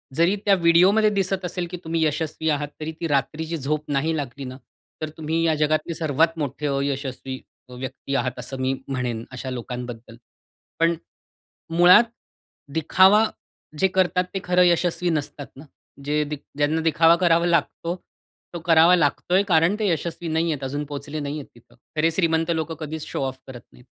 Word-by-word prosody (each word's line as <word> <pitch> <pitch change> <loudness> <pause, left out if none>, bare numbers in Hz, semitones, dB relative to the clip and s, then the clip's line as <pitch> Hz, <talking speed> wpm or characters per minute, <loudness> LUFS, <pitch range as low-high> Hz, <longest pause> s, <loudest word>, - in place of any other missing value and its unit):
जरी 170 +5 +3
त्या 200 -1 +5
व्हिडिओमध्ये 185 +5 +5
दिसत 195 -2 -1
असेल 180 0 -3
की 180 - -4
तुम्ही 165 0 0
यशस्वी 155 +1 -1
आहात, 145 -1 0
तरी 155 +1 -4
ती 165 - 0
रात्रीची 155 +3 -1
झोप 150 +1 -2
नाही 150 +4 +1
लागली 140 -1 -5
ना, 130 0 -7 0.4
तर 155 - -2
तुम्ही 160 +1 -1
या 160 -1 +3
जगातली 155 +2 0
सर्वात 160 +1 +1
मोठे 145 0 -3
अयशस्वी 135 -2 -3 0.3
अ, - - -11
व्यक्ती 130 +2 -5
आहात, 125 -1 -1
असं 130 +2 -6
मी 130 +1 +1
म्हणेन 125 -4 -3
अशा 130 +1 -6
लोकांबद्दल. 120 -2 -6 0.6
पण 165 +1 +3 0.8
मुळात 180 +5 +8 0.7
दिखावा 190 +7 +5 0.5
जे 190 - +4
करतात 185 -1 +1
ते 195 - -1
खरं 180 0 +4
यशस्वी 175 0 +2
नसतात 145 -2 -3
ना. 140 +4 -12 0.4
जे 150 +1 +1
दिख 150 -1 -5 0.2
ज्यांना 150 +2 +1
दिखावा 165 +1 +5
करावा 170 -1 +3
लागतो, 170 0 0 0.6
तो 170 - -4
करावा 165 +1 +6
लागतोय 175 +4 +2
कारण 170 +1 +4
ते 215 - +1
यशस्वी 170 +1 -3
नाहीयेत, 160 -3 -1
अजून 145 +3 -3
पोहोचले 145 +1 -6
नाहीयेत 145 0 -4
तिथं. 120 - -21 0.2
खरे 160 +2 +2
श्रीमंत 165 -1 +1
लोकं 160 0 -2
कधीच 155 0 -5
शो - - -4
ऑफ 130 0 -6
करत 125 -2 -9
नाहीत. 125 - -18
160 Hz, 165 wpm, -23 LUFS, 140-170 Hz, 0.8 s, मुळात